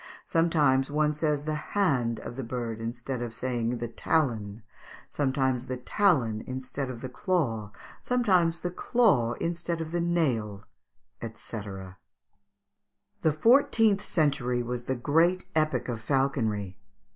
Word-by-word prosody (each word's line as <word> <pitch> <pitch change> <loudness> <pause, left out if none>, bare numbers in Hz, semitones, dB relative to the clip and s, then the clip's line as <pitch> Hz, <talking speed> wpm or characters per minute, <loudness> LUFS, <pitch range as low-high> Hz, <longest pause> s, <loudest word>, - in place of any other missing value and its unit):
Sometimes 150 -5 +3
one 150 +1 +2
says 150 -1 0
the 155 - -1
hand 140 - 0
of - - -7
the 135 - -4
bird 115 -2 -4
instead 120 +2 -4
of 115 -2 -5
saying 120 -1 -1
the 120 - -3
talon, 115 -5 -1 0.5
sometimes 130 -3 0
the 130 - -3
talon 125 - +2
instead 130 +1 -4
of 120 -2 -7
the 130 - -4
claw, 125 - -1 0.3
sometimes 185 -9 +2
the 175 - -2
claw 180 - +2
instead 170 +2 -2
of 160 -1 -4
the 175 0 0
nail" 120 - 0 0.7
&c. 115 - -9 1.6
The 160 - +3
fourteenth 225 - +4
century 135 -8 +1
was 120 0 -4
the 130 - -1
great 165 +9 +2
epoch 155 -6 +1
of 115 -3 -4
falconry. 110 -7 0
135 Hz, 130 wpm, -28 LUFS, 120-165 Hz, 1.6 s, fourteenth